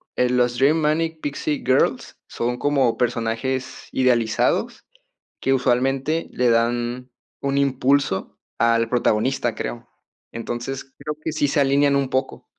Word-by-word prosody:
"El 125 0 +2
los 120 0 +1
Dream 145 +4 +4
Manic 160 +1 0
Pixie 145 +1 -3
Girls 130 +1 +1
son 125 +1 -2
como 135 -5 +1
personajes 120 +2 -2
idealizados 125 - +1 0.6
que, 135 - +2
usualmente, 135 +5 +1
le 125 -1 +1
dan 120 +2 0 0.3
un 140 0 -1
impulso 135 -6 +1 0.2
al 115 0 +3
protagonista", 120 0 +1
creo. 120 0 -5 0.4
Entonces, 120 +3 -5
creo 150 0 -4
que 160 - -2
sí 145 - +1
se 145 - 0
alinean 140 +1 +3
un 135 -2 0
poco. 130 0 -2
130 Hz, 130 wpm, -22 LUFS, 120-140 Hz, 0.6 s, Dream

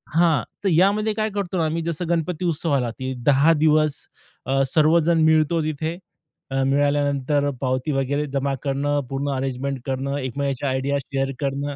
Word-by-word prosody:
हां, 165 -6 +3 0.2
तर 195 - +2
यामध्ये 200 +6 +3
काय 215 +1 -1
करतो 195 -2 -3
ना 165 - +1
आम्ही, 160 +2 -1
जसं 170 +1 -2
गणपती 170 +1 -1
उत्सव 165 -1 -1
आला, 125 -3 0
की 130 0 -3
10 145 +3 +5
दिवस 155 -2 +3 0.5
अ, 135 +1 +1
सर्वजण 160 +3 +3
मिळतो 160 +1 +3
तिथे. 155 +2 -3 0.5
अ, 135 0 +1
मिळाल्यानंतर 145 0 +1
पावती 130 +2 -1
वगैरे 140 +2 0
जमा 140 0 0
करणं, 145 +1 0
पूर्ण 140 +1 -2
अरेंजमेंट 135 +1 -3
करणं, 135 +1 -2
एकमेकाच्या 140 +1 -2
आयडिया 130 +2 0
शेअर 135 0 -2
करणं. 140 0 -2
145 Hz, 160 wpm, -22 LUFS, 135-160 Hz, 0.5 s, 10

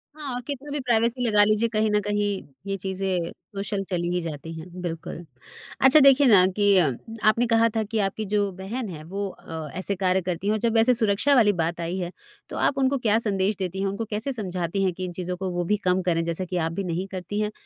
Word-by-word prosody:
हाँ 275 -5 -5
कितनी 285 +1 -5
भी 290 - -2
प्राइवेसी 240 0 +1
लगा 210 -1 +5
लीजिए 215 +2 +3
कहीं 215 -1 +1
न 210 - +3
कहीं 205 0 0 0.4
ये 195 - -1
चीज़ें 190 -2 -2 0.2
सोशल 195 0 -2
चली 175 -1 -1
ही 180 - 0
जाती 165 0 -6
हैं 180 +2 -9
बिल्कुल। 165 0 -5 0.6
अच्छा 265 +3 +7
देखिए 275 0 +6
ना 190 -5 +7
कि 205 -1 +4
अ, 160 -6 +4 0.4
आपने 235 +2 +2
कहा 230 0 +4
था 220 - +1
कि 220 +1 -2
आपकी 215 +2 -5
जो 205 -1 +2
बहन 200 +5 -5
है 155 -3 -8
वो 195 +4 -4
अ, 160 -4 -8
ऐसे 195 +1 0
कार्य 185 0 +1
करती 180 +2 -3
हैं। - - +3
और 215 - -1
जब 230 0 +1
ऐसे 240 +3 +5
सुरक्षा 230 +5 +2
वाली 210 -4 +5
बात 170 +1 -2
आई 170 +3 -3
है 175 0 -3 0.4
तो - - -6
आप 275 - +1
उनको 270 +1 +2
क्या 225 -2 +2
संदेश 200 -2 0
देती 190 0 -3
हैं 195 - 0
उनको 200 +3 -3
कैसे 220 +6 -2
समझाती 185 -3 -2
हैं 185 -2 +1
कि 185 +1 -5
इन 180 - -5
चीज़ों 180 0 -4
को 190 0 -3
वो 175 0 -1
भी 210 +3 +1
कम 185 -1 +1
करें? 165 -2 +1
जैसा 170 +2 -2
कि 180 0 -3
आप 165 -1 0
भी 195 +4 -3
नहीं 180 +2 -3
करती 190 +2 -5
हैं 210 0 -1
195 Hz, 240 wpm, -25 LUFS, 180-225 Hz, 0.6 s, अच्छा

